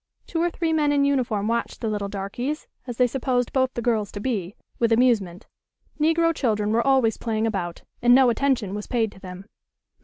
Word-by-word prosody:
Two 330 - -2
or 345 - +2
three 330 -1 -1
men 300 -2 +2
in 285 -1 +3
uniform 240 -7 0
watched 235 +1 -2
the 230 - -3
little 205 -2 -2
"darkies," 240 +9 -4 0.2
as 240 -2 -6
they 250 - +5
supposed 245 -1 -1
both 260 -1 +2
the 235 - -3
girls 220 -4 0
to 205 - -5
be, 205 -5 -3 0.2
with 230 -1 +2
amusement. 225 -6 +2 0.5
Negro 330 +2 +3
children 215 -7 0
were 230 +1 +3
always 260 -4 +2
playing 225 -1 -1
about, 185 -6 -3 0.2
and 245 +1 +6
no 260 -2 +5
attention 240 -6 0
was 210 0 -5
paid 225 -4 0
to 190 - -16
them. 185 0 -9
235 Hz, 195 wpm, -24 LUFS, 210-265 Hz, 0.5 s, and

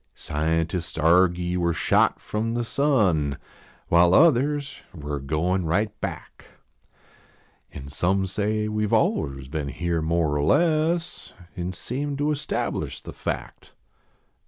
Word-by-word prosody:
Scientists 80 +3 -2
argy 90 +2 +3
we 90 -1 0
re 85 - +1
shot - - +2
from 115 +2 -3
the 120 0 -1
sun. 95 - +1 0.5
While 85 +1 +5
others 145 -2 +3
we 75 -2 -7
re 70 - -2
goin 80 +7 0
right 100 +6 +1
back. - - -6 1.3
An 70 -1 -9
some 90 +7 0
say 105 +3 -1
we 105 0 -1
ve - - +2
aliens 70 -2 0
been 75 0 -3
here 85 +2 -2
more 80 -2 +1
or 70 - 0
less, 165 - +1 0.2
An 90 -1 -3
seem 140 +9 -4
to 145 +1 +1
establish 150 0 -3
the - - -8
fact. - - -6
90 Hz, 135 wpm, -24 LUFS, 80-120 Hz, 1.3 s, While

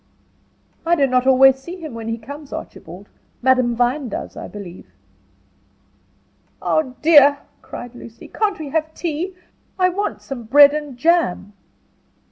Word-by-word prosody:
"I 340 +1 +2
do 285 -4 +3
not 255 -1 +1
always 265 0 +6
see 340 +7 -9
him 320 -7 -9
when 225 -1 -7
he 225 0 -2
comes, 285 +5 -11
Archibald. 180 +5 -9 0.4
Madame 255 -2 +3
Vine 245 +3 0
does, - - -6
I - - -7
believe." 190 - -10 1.7
"Oh, 270 -5 -1
dear!" 290 -3 +7 0.2
cried 245 0 -9
Lucy, 235 -1 -12
"can't 420 -2 -1
we 305 -3 -7
have 315 +1 -2
tea? 345 +3 -4 0.4
I 365 -1 +3
want 400 +3 -4
some 250 -4 -7
bread 285 +5 +7
and 295 -4 -5
jam." 315 - +1
275 Hz, 140 wpm, -20 LUFS, 240-315 Hz, 1.7 s, dear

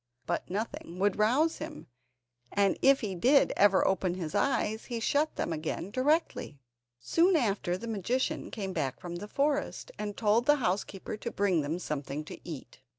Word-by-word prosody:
But - - -2
nothing 195 -3 -4
would 200 +1 +1
rouse 265 +10 +3
him, 305 0 -7 0.7
and 200 -1 +3
if 275 0 +5
he 205 -4 -2
did 255 +11 +4
ever 195 -1 +5
open 190 -2 +1
his 165 -4 -5
eyes 220 -5 0
he 235 -1 -4
shut 290 +7 +1
them 170 - -1
again 160 +4 -4
directly. 285 - 0 0.4
Soon 335 - +3
after, 200 - +1
the 235 - -7
magician 230 +4 -1
came 195 -4 -4
back 140 -6 -2
from 175 -1 -6
the 205 +4 -7
forest, 290 - -1
and 205 -1 -4
told 225 +2 +2
the 295 - +7
housekeeper 200 -4 -2
to 235 - -4
bring 195 -7 +1
them 150 +4 -2
something 150 -3 -4
to - - -9
eat. 145 -9 -8
205 Hz, 170 wpm, -30 LUFS, 180-260 Hz, 0.7 s, the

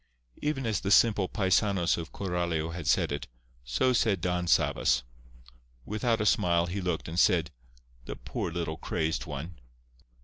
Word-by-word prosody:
Even 150 -4 -1
as 110 -4 0
the 100 - -2
simple 105 -1 +4
paisanos 95 -2 +2
of 80 -2 -6
Coralio 85 -4 -2
had 85 -3 -6
said 70 - +2
it, 70 0 -4 0.4
so 60 - +1
said 110 -5 +2
Don 90 +1 -1
Sabas. - - +2 0.8
Without 110 +2 0
a 105 - 0
smile, 85 -4 +3
he 95 +3 -4
looked, 90 -3 -2
and 85 +2 -2
said, 85 -5 +3 0.5
"The - - -6
poor - - -4
little 80 -2 -3
crazed 80 0 -2
one!" 75 +3 -7
90 Hz, 150 wpm, -29 LUFS, 80-100 Hz, 0.8 s, simple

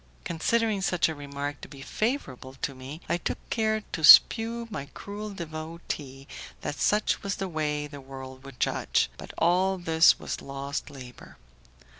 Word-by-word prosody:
Considering 215 +5 0
such 180 -2 +2
a 160 - -3
remark 145 0 -5
to - - -8
be 135 -1 -11
favourable 135 - -3
to 135 - -3
me, 135 +5 -9
I - - +1
took 175 - -3
care 220 -1 +1
to 160 - -4
shew 230 +8 +7
my 140 -8 -5
cruel 210 +1 -6
devotee 155 -6 -7 0.3
that - - -3
such 210 +1 +2
was 200 0 -2
the 195 - -3
way 150 -3 -2
the 145 -1 -9
world 130 -1 -10
would 135 -3 -12
judge, - - +1
but - - -8
all 185 +3 +3
this 165 -1 +5
was - - -5
lost 140 +2 -5
labour. 130 -3 -12
155 Hz, 160 wpm, -27 LUFS, 140-195 Hz, 0.3 s, shew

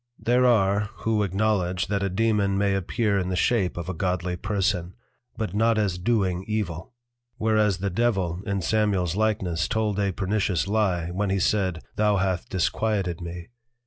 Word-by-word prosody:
There 125 +2 +3
are, 100 -3 +2 0.2
who 110 -1 +2
acknowledge 95 -2 0
that 100 0 -1
a 100 - 0
Dæmon 100 -1 +1
may 100 0 +2
appear 100 +2 0
in 90 -1 -2
the 90 - -1
shape 95 -1 +1
of 85 -1 -4
a 95 - -2
Godly 90 0 -1
Person, 95 -2 -1 0.4
But 110 -3 -3
not 115 +2 +2
as 95 -4 0
doing 95 -3 0
Evil. 105 -1 -3 0.4
Whereas 110 -3 +2
the 100 +2 -2
Devil 95 -5 0
in 100 -2 -1
Samuel's 95 -4 +1
likeness 95 -6 0
told 105 -2 0
a 100 -1 +1
pernicious 95 -2 0
Lye, 95 -5 0
when 100 +2 -1
he 95 - +1
said, 95 -4 0
_Thou 105 -2 +3
hath 95 +4 -1
disquieted 95 -2 -1
me. 85 0 -7
100 Hz, 165 wpm, -25 LUFS, 90-110 Hz, 0.4 s, There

